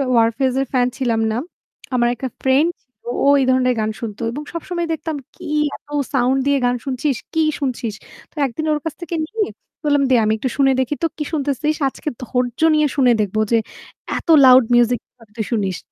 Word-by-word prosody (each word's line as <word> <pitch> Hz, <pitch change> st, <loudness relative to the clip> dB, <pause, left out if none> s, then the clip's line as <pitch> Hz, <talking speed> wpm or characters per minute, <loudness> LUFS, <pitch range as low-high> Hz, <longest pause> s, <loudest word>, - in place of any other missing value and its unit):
Warfaze 235 Hz, +3 st, +2 dB
এর -, -, 0 dB
fan 250 Hz, -1 st, +3 dB
ছিলাম 235 Hz, -4 st, 0 dB
না। 220 Hz, -, -1 dB, 0.6 s
আমার 240 Hz, -1 st, +3 dB
একটা 260 Hz, 0 st, -5 dB
ফ্রেন্ড 270 Hz, +5 st, +4 dB
ছিল। 255 Hz, -, -45 dB, 0.3 s
ও -, -, +4 dB
এই 265 Hz, -, +2 dB
ধরনের 255 Hz, -1 st, +3 dB
গান 215 Hz, 0 st, 0 dB
শুনতো। 220 Hz, -1 st, -6 dB
এবং 290 Hz, +5 st, -5 dB
সবসময় 345 Hz, 0 st, -3 dB
দেখতাম 315 Hz, 0 st, -4 dB, 0.2 s
কি -, -, -9 dB, 0.3 s
এত -, -, -58 dB, 0.3 s
সাউন্ড 260 Hz, +1 st, +2 dB
দিয়ে 280 Hz, 0 st, +3 dB
গান 245 Hz, 0 st, +2 dB
শুনছিস, 270 Hz, +1 st, -1 dB, 0.2 s
কি 320 Hz, -, +2 dB, 0.2 s
শুনছিস? 250 Hz, -5 st, -2 dB, 0.4 s
তো -, -, -34 dB
একদিন 270 Hz, +4 st, -4 dB
ওর 300 Hz, -, 0 dB
কাছ 320 Hz, -, -2 dB
থেকে 345 Hz, 0 st, -4 dB
নিয়ে 425 Hz, +2 st, -1 dB, 0.4 s
বললাম 290 Hz, -1 st, +3 dB
"দে 260 Hz, -, +5 dB
আমি 215 Hz, 0 st, +2 dB
একটু 260 Hz, +4 st, -2 dB
শুনে 270 Hz, -1 st, +4 dB
দেখি 260 Hz, +3 st, 0 dB
তো -, -, +4 dB
কি 305 Hz, -, -2 dB
শুনতেছিস? 295 Hz, +1 st, 0 dB
আজকে 300 Hz, -, -5 dB
ধৈর্য 250 Hz, -1 st, -2 dB, 0.2 s
নিয়ে 305 Hz, -1 st, +3 dB
শুনে 260 Hz, -4 st, +4 dB
দেখব 205 Hz, 0 st, -2 dB
যে 230 Hz, -, +5 dB, 0.6 s
এত -, -, -8 dB, 0.2 s
লাউড 255 Hz, 0 st, +8 dB
মিউজিক 240 Hz, 0 st, +4 dB
কিভাবে 230 Hz, -4 st, -22 dB
তুই 220 Hz, -, -1 dB
শুনিস?" 195 Hz, -6 st, 0 dB
260 Hz, 195 wpm, -20 LUFS, 240-295 Hz, 0.6 s, লাউড